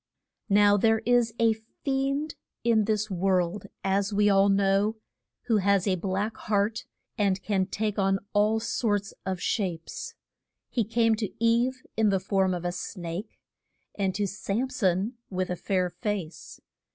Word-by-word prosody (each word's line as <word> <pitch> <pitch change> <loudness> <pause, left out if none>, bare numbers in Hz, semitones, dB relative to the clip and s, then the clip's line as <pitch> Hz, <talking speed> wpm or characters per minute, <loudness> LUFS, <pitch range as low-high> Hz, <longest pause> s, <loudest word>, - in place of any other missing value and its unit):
Now 205 0 +5
there 220 +2 +3
is 245 -2 +3
a 230 -1 +4
fiend 275 +6 -2 0.3
in 225 -2 +3
this 215 -1 0
world, 185 +1 0 0.2
as 195 +1 +1
we 205 0 +3
all 195 0 +5
know, 195 +2 +2 0.5
who 225 -3 +2
has 200 -1 +2
a 195 - +2
black 195 +4 -2
heart, 210 +1 0 0.3
and 195 -2 +2
can 190 -3 0
take 210 +1 -2
on 195 0 +3 0.2
all 210 +2 +3
sorts 205 -3 -1
of 190 -1 -2
shapes. 215 - -3 0.6
He 230 -4 +1
came 225 +1 +2
to 210 -3 -3
Eve 240 +3 +2
in 220 -1 +3
the 195 -1 +2
form 190 -1 +1
of 175 0 -5
a 175 - 0
snake, 175 +2 -6 0.6
and 190 -2 -1
to 205 +1 0
Sam 210 +6 -2
son 205 -1 0
with 185 -1 -2
a - - 0
fair 180 0 -1
face. 180 -3 -5
205 Hz, 150 wpm, -27 LUFS, 190-225 Hz, 0.6 s, Now